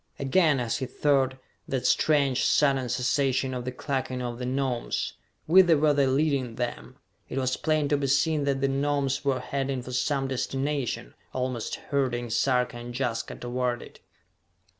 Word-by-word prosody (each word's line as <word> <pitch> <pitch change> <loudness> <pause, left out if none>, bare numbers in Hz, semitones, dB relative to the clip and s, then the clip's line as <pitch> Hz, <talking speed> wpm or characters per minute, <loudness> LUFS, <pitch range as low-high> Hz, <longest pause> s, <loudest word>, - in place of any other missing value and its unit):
Again, 145 +1 +3
as 120 -2 -1
he 130 - -3
thought, 135 -2 +1 0.3
that 130 -2 -2
strange, 140 -4 +3
sudden 135 -4 +3
cessation 130 +1 +1
of 125 -1 -4
the 125 - -2
clucking 130 -1 -3
of 120 -1 -4
the 125 - -3
Gnomes. 130 -2 -1 0.3
Whither 175 -1 +6
were 150 0 +3
they 140 -1 +3
leading 135 -3 +1
them? 120 0 -4 0.3
It - - -5
was 130 -1 +1
plain 155 -2 +1
to 145 - +3
be 140 -1 -1
seen 145 +2 +2
that 135 -1 0
the 135 - +3
Gnomes 140 0 0
were 135 -2 +1
heading 135 0 -2
for 125 - -8
some 135 +2 0
destination, 135 - -2 0.2
almost 125 -3 -2
herding 125 -4 -2
Sarka 125 0 +1
and 120 0 -8
Jaska 115 -4 -2
toward 125 0 -2
it. - - -14
135 Hz, 160 wpm, -27 LUFS, 125-140 Hz, 0.3 s, Whither